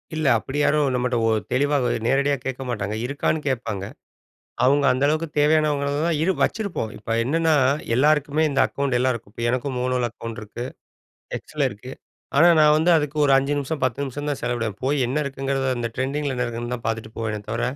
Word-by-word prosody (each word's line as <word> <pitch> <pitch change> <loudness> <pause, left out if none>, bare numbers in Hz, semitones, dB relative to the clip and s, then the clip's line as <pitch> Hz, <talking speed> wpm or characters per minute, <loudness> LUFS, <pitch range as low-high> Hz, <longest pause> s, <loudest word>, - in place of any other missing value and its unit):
இல்ல, 155 0 -2
அப்டி 140 +5 -4
யாரும் 145 -2 +2
நம்மட்ட 125 0 0
ஒரு 110 -1 +3
தெளிவாக 140 -1 +2 0.2
நேரடியா 140 +2 +2
கேக்க 130 0 -4
மாட்டாங்க, 105 -3 -2
இருக்கான்னு 140 +3 -1
கேட்பாங்க. 115 -7 -2 0.8
அவுங்க 140 +2 +3
அந்த 130 +2 0
அளவுக்கு 155 +2 0
தேவையானவங்கள 150 -1 +2 0.2
தான் 170 -2 +1
இரு 175 +4 +3
வச்சிருப்போம். 200 - -1
இப்ப 110 - -12
என்னன்னா, 160 +5 +2 0.4
எல்லாருக்குமே 150 +2 +2
இந்த 135 -1 -1
அக்கவுண்ட் 140 -3 -1
எல்லாருக்கும். 120 -5 -1
இப்ப 115 - -5
எனக்கும் 130 +2 -1
முளோல 125 -1 0
அக்கவுண்ட் 115 +1 -7
இருக்கு 105 +3 -7 0.7
எக்ஸல - - -2
இருக்கு. - - -10 0.4
ஆனா, 170 +4 +7
நான் 150 0 +6
வந்து 165 +3 +3
அதுக்கு 150 -1 -2
ஒரு 140 - +4
5 135 +2 +1
நிமிஷம், 145 +2 -3
10 130 +2 -1
நிமிஷம் 145 +3 -5
தான் 145 - -3
செலவிடுவேன். 115 -4 -2
போய் 140 +3 +1
என்ன 130 +4 -3
இருக்குங்கிறத 135 0 -2
அந்த 120 -1 -2
ட்ரெண்டிங்கில 140 +2 -2
என்ன 125 - 0
இருக்குன்னு 120 +1 -4
தான் 120 - -8
பாத்துட்டு 110 -1 -3
போவேனே 105 -2 -2
தவர, 115 +2 -2
135 Hz, 180 wpm, -23 LUFS, 120-145 Hz, 0.8 s, ஆனா